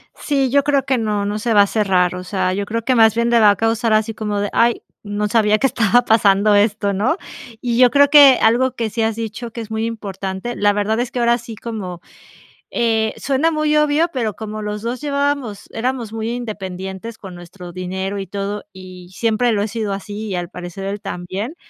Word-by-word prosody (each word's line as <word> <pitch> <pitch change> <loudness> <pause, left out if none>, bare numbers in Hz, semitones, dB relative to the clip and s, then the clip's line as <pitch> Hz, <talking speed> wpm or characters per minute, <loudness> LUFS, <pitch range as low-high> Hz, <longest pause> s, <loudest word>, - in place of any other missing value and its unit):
Sí, 275 -3 0
yo 280 +2 +3
creo 280 -1 +2
que 260 -1 +1
no. 210 -2 -1
No 205 +1 -2
se 225 +1 0
va 205 - +7
a 200 - -1
cerrar, 185 -5 +1
o 180 - -6
sea, 185 -1 -1
yo 200 +1 -2
creo 230 +2 -3
que 255 +2 +1
más 220 -2 +5
bien 235 +1 +1
le 235 - +4
va 210 -2 +6
a 205 - 0
causar 225 +2 0
así 215 +1 +1
como 210 -1 -3
de: 205 0 -1
"Ay, 235 0 +2 0.2
no 205 0 -2
sabía 215 0 +3
que 270 - +2
estaba 235 -1 +3
pasando 205 -1 +4
esto.", 205 -1 +2
¿no? 235 - 0 0.4
Y 240 -2 -1
yo 250 0 +6
creo 285 0 +5
que 285 -3 +8
algo 245 +3 +3
que 230 -3 -2
sí 225 - -3
has 220 -1 0
dicho 230 +1 -6
que 230 - -6
es 220 - -9
muy 220 +1 -1
importante, 200 0 -5
la 205 0 +2
verdad 210 +2 0
es 240 0 -2
que 250 - -3
ahora 235 0 +3
sí 230 -1 -9
como, 200 -6 -6 0.7
eh, 220 -2 0
suena 280 +4 +1
muy 305 -1 +1
obvio, 300 +2 +3
pero 230 -6 -2
como 215 -1 -6
los 210 0 -4
2 240 +3 -3
llevábamos 280 -7 -2
éramos 240 -1 -3
muy 225 0 -3
independientes 205 -2 -6
con 190 -3 -10
nuestro 175 0 -11
dinero 190 +2 -4
y 195 - -5
todo, 200 +2 -4
y 185 -1 -12
siempre 230 +3 +1
lo 205 - 0
he 215 - -2
sido 215 -2 -3
así 205 +2 -6
y 195 - -3
al 175 0 -4
parecer 180 +2 -8
él 200 +1 -4
también, 195 - -5
220 Hz, 220 wpm, -19 LUFS, 200-240 Hz, 0.7 s, que